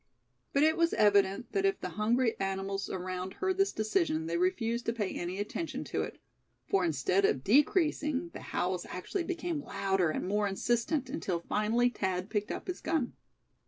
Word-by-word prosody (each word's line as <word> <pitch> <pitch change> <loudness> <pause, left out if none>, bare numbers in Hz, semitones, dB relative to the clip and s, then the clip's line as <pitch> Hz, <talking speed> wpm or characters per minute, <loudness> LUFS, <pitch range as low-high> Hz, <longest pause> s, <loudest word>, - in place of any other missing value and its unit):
But 280 - +3
it 315 +1 +4
was 335 0 +2
evident 200 +1 +3
that 395 - 0
if 390 0 +2
the - - -4
hungry 230 +3 +1
animals 195 0 -2
around 185 0 -4
heard 380 -1 -1
this 390 0 +4
decision 215 - 0
they 165 +1 -2
refused 225 +6 0
to 230 - +2
pay 210 -5 -2
any 175 +2 -3
attention 210 +11 -3
to - - -2
it; - - -5 0.5
for 195 -1 +2
instead 175 +4 +1
of 135 -8 +2
decreasing, 295 - +2
the - - -7
howls 180 0 -2
actually 340 - -3
became 340 -3 -2
louder 195 - 0
and 170 - -2
more 205 +1 +1
insistent, 240 +7 0
until 195 - -2
finally 220 +6 +2
Thad 190 -4 -2
picked 210 -2 -1
up - - -4
his 365 - -5
gun. 315 -6 0
210 Hz, 175 wpm, -31 LUFS, 190-290 Hz, 0.5 s, it